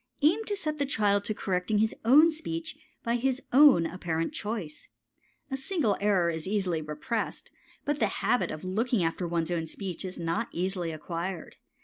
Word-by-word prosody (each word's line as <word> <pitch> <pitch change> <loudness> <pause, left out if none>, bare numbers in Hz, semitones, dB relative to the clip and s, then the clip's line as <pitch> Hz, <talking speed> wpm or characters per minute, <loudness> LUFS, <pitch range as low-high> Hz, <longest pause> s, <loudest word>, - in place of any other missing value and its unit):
Aim 355 +9 +4
to 415 - -1
set 305 -6 -3
the 285 - +1
child 205 -7 +2
to 215 - -2
correcting 190 +2 0
his 220 +1 +2
own 295 +8 +7
speech 320 0 -5 0.3
by 235 +1 +1
his 260 +1 0
own 265 - +7
apparent 165 -1 -2
choice. 205 -8 -5 0.6
A - - 0
single 270 - 0
error 190 -5 +3
is 160 0 -4
easily 190 -5 0
repressed, 155 - -4 0.3
but 290 0 0
the - - +3 0.2
habit 245 - +2
of 155 - -6
looking 210 +3 0
after 165 +2 -1
one's 170 0 -1
own 165 -2 -1
speech 185 +1 -5
is 185 -1 -5
not 170 +7 -1
easily 180 -1 -1
acquired. 170 +2 -5
200 Hz, 170 wpm, -29 LUFS, 170-265 Hz, 0.6 s, own